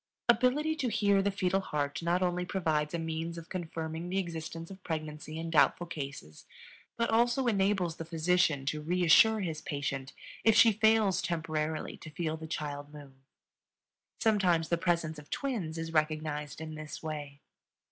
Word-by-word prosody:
Ability 255 +7 +3
to 260 -6 0
hear 200 -2 +3
the 200 - +1
fetal 190 -1 +1
heart 145 -6 -2
not 175 +2 +1
only 180 0 0
provides 160 -4 0
a - - 0
means 165 +1 -3
of 165 0 -9
confirming 165 -1 -4
the 190 - -1
existence 165 -1 -4
of 190 -1 -11
pregnancy 155 -1 -5
in 165 0 -4
doubtful 170 +2 +4
cases, 140 - -7 0.5
but 235 0 +1
also 240 +3 +3
enables 195 -6 +1
the - - -4
physician 165 -3 +1
to 150 +2 -1
reassure 180 +7 +5
his 160 -4 -3
patient 135 -2 -3 0.3
if 225 -1 +5
she 230 0 +8
fails 220 -2 +3
temporarily 155 -2 -2
to - - -10
feel 160 0 -2
the 160 0 -8
child 145 -2 -4
move. 145 -2 -12 1.1
Sometimes 185 -7 +2
the 170 - +3
presence 165 -3 0
of 150 - -14
twins 210 - -3
is 165 0 -4
recognized 155 -2 -1
in 160 -1 -6
this 155 +1 -8
way. 145 -3 -5
165 Hz, 160 wpm, -31 LUFS, 155-195 Hz, 1.1 s, she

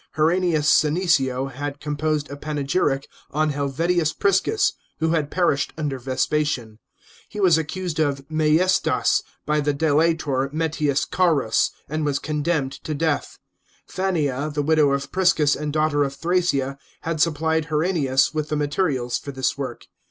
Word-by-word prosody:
Herennius 160 -1 +2
Senecio 145 -6 +2
had 145 +2 -5
composed 150 0 -1
a - - -5
panegyric 145 -1 -1 0.2
on 155 +1 0
Helvidius 155 +4 0
Prisons, 200 - +2 0.2
who 160 0 0
had 155 -3 0
perished 170 -6 +1
under 145 -4 -2
Vespasian; 130 -3 -1 0.5
he 210 - -7
was 185 -5 +5
accused 160 +1 -4
of 140 -3 0
maiestas 160 +4 +2 0.2
by 150 0 +1
the 145 -1 0
delator 150 -3 +1
Metius 155 -3 0
Carus, 155 -11 +2 0.2
and 155 +1 -2
was 145 -2 0
condemned 150 -1 -1
to 155 - -3
death. 155 0 -1 0.5
Fannia, 155 -7 -1
the 145 0 -1
widow 155 -1 +3
of 140 0 -2
Priscus 180 -6 +3
and 150 0 -3
daughter 155 -1 +2
of 140 0 -3
Thrasea, 155 -6 0 0.2
had 160 -2 -2
supplied 160 0 +1
Herennius 150 -4 +1
with 155 -1 -2
the 150 - -1
materials 145 -5 0
for 140 - -7
this 130 -2 -1
work. 130 -4 -6
150 Hz, 140 wpm, -23 LUFS, 140-160 Hz, 0.5 s, was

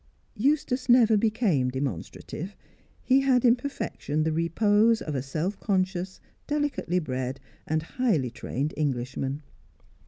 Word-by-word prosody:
Eustace 265 +1 0
never 235 -3 +6
became 205 - +2
demonstrative; 135 - -5 0.5
he 265 +1 +4
had 260 -2 +3
in 240 0 +7
perfection 245 - -3
the 160 - +1
repose 205 +7 +3
of 150 - -5
a 135 - -1
self 155 +9 -3
conscious, 185 -2 -1 0.3
delicately 290 - -1
bred, 130 -5 -3 0.3
and 155 0 0
highly 165 - 0
trained 135 +4 -3
Englishman. 135 0 -2
185 Hz, 120 wpm, -27 LUFS, 145-235 Hz, 0.5 s, in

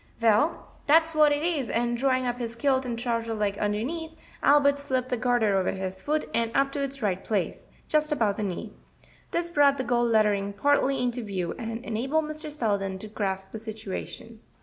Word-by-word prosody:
"Well, 230 +8 +2 0.2
dat's 325 +2 +5
what 305 -1 +5
it 290 +1 0
is 310 -8 0
and 240 +1 0
drawing 255 +1 +1
up 245 0 -2
his 230 -1 -4
kilt 260 +1 +1
and 235 -1 -3
the - - -4
trouser 230 -2 -1
leg 205 -1 -1
underneath, 245 +11 -2 0.3
Albert 285 0 +4
slipped 260 -3 -2
the 250 - +1
garter 230 -4 +2
over 190 -1 +1
his 190 0 -5
foot 305 +1 0
and 230 -1 +1
up 275 0 +3
to 285 - -3
its 275 -2 -4
right 190 -2 0
place, 205 -5 -2 0.2
just 305 0 +1
above 225 -9 +1
the - - -3
knee. 190 -4 -4 0.6
This 340 0 0
brought 285 -3 +4
the 260 - -1
gold 240 -1 +1
lettering 205 -2 +2
partly 275 +2 +2
into 245 0 -1
view, 190 -5 -3
and 230 +1 -5
enabled 270 +8 0
Mr. 305 0 -4
Selden 200 -8 -1
to 215 - -8
grasp 195 -2 -3
the 220 - -6
situation. 220 +1 -7
240 Hz, 195 wpm, -27 LUFS, 210-280 Hz, 0.6 s, dat's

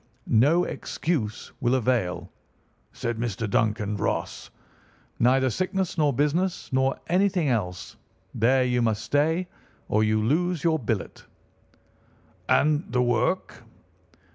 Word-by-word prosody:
"'No 145 +10 +4
excuse 120 -11 -3
will 120 +1 +2
avail,' 120 -7 -1 0.6
said 115 -1 -4
Mr. 115 -2 -2
Duncan 105 0 0
Ross; - - -3 0.7
'neither 130 +2 +3
sickness 185 - -2
nor 150 -4 +2
business 150 +6 -1
nor 130 +1 +2
anything 180 -3 +1
else. 90 -7 -3 0.4
There 130 +4 +3
you 125 -1 +1
must 110 -2 0
stay, 160 +5 +1 0.4
or 110 +1 +2
you 110 0 +2
lose 160 +9 0
your 160 -2 +2
billet.' 110 -5 -3 1.3
"'And 150 +2 +2
the 125 0 +2
work? 120 +9 0
130 Hz, 115 wpm, -25 LUFS, 110-160 Hz, 1.3 s, No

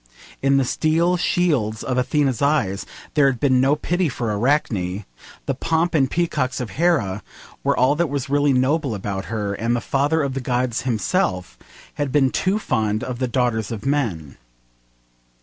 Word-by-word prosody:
In 135 0 +3
the 135 - +2
steel 165 +6 +1
shields 145 - 0
of 130 - -2
Athena's 130 -1 0
eyes 120 -10 +1 0.3
there 145 -2 +4
had 130 -3 0
been 130 -3 +3
no 135 +3 +3
pity 175 +2 0
for 115 -4 -2
Arachne; 105 -6 0 0.4
the - - 0
pomp 160 +6 0
and 135 -5 +3
peacocks 165 -6 -1
of 120 -6 -4
Hera 135 - +1 0.4
were - - +1
all 130 +3 +4
that 170 0 0
was 140 -1 -3
really 145 +1 +2
noble 130 0 +1
about 100 0 -4
her; 105 -3 -3
and 115 +4 -1
the - - 0
Father 145 +6 +1
of 140 -1 -2
the 135 - -3
Gods 125 -1 -1
himself 90 -4 -1 0.5
had 145 -2 -1
been 135 -2 +3
too 190 +2 +1
fond 110 - -1
of 125 -2 -5
the 130 - 0
daughters 120 -3 0
of 110 0 -6
men. 110 - -1
130 Hz, 170 wpm, -22 LUFS, 110-145 Hz, 0.5 s, there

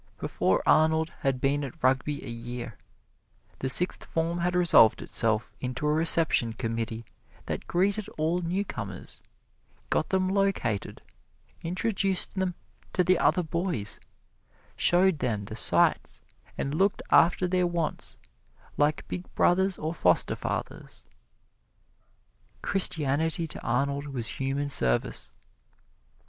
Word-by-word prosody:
Before - - 0
Arnold 160 +1 +3
had 135 -2 0
been 140 +2 0
at 135 -3 -8
Rugby 135 +3 +1
a - - -8
year, 120 -1 -6 0.8
the 130 - -2
Sixth 180 +7 +1
Form 165 +1 -2
had 175 +1 0
resolved 170 -11 +5
itself 110 0 +1
into 130 +3 -4
a 150 - +2
Reception 160 -7 +3
Committee 115 -1 -4 0.4
that - - -5
greeted 200 +4 0
all 165 +3 0
newcomers, 165 - -4 0.7
got 155 - +1
them 190 -1 +1
located, 195 - -1 0.6
introduced 190 +2 -1
them 190 -2 -2 0.4
to 180 - +2
the 180 0 +3
other 180 - +2
boys, 165 - -2 0.8
showed 180 -2 +3
them 105 -6 -2
the 110 +2 -7
sights, - - +1 0.3
and 140 - -2
looked 195 +5 +1
after 175 +2 +4
their 180 0 +1
wants 170 -3 -2 0.6
like 150 +1 +1
big 180 - -6
brothers 190 +1 +3
or 155 +2 -3
foster - - +2
fathers. - - -5 1.6
Christianity 160 -2 +1
to 155 - -8
Arnold 140 +4 -1
was 125 -5 -3
human 135 +2 -1
service. - - 0
155 Hz, 120 wpm, -27 LUFS, 125-180 Hz, 1.6 s, resolved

